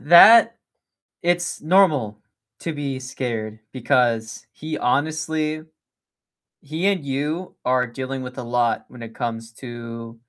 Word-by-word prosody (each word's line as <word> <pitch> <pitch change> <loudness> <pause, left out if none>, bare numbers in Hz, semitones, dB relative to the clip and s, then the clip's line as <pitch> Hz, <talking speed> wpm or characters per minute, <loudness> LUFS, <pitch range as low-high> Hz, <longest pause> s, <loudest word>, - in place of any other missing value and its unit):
that 225 +9 +8 0.7
it's 175 0 0
normal 155 - +3 0.4
to 165 - -4
be 140 -3 -3
scared 115 -4 -4
because 120 -3 0
he 155 +1 -5
honestly 155 +3 0 1.0
he 160 +6 -2
and 190 -7 +1
you 150 +7 -3
are 125 0 +2
dealing 130 +2 -5
with 125 +1 -8
a 125 - -4
lot 120 0 0
when 120 -2 -11
it 115 - -9
comes 115 -1 -4
to 115 -1 -9
130 Hz, 125 wpm, -22 LUFS, 120-155 Hz, 1.0 s, that